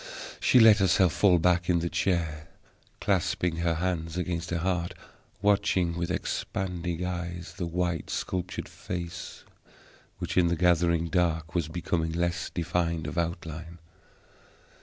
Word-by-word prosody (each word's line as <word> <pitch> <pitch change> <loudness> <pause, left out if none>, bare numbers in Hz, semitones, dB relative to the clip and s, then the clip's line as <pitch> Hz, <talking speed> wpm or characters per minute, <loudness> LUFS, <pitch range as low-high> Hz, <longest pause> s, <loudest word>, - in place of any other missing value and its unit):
She 125 - +5
let 110 -2 +8
herself 95 -2 +4
fall 95 -4 +5
back 90 +1 +2
in 90 - +4
the 85 0 0
chair, 80 -4 -1 0.5
clasping 90 -3 0
her 85 -1 +1
hands 85 -1 -2
against 85 -2 -2
her 85 - 0
heart, 90 0 -1 0.5
watching 100 -4 +2
with 85 0 -2
expanding 90 -2 -2
eyes 85 -1 -4
the 90 -4 -2
white 85 -1 -1
sculptured 90 -1 -3
face 85 -1 -6 0.7
which, - - -4
in 90 -2 +5
the 85 - +1
glittering 85 -1 +3
dark, 80 -1 0
was 85 -4 0
becoming 80 -1 -1
less 85 0 -1
defined 85 -2 -1
of 75 - -5
outline. 85 -1 -4
85 Hz, 135 wpm, -28 LUFS, 85-90 Hz, 0.7 s, let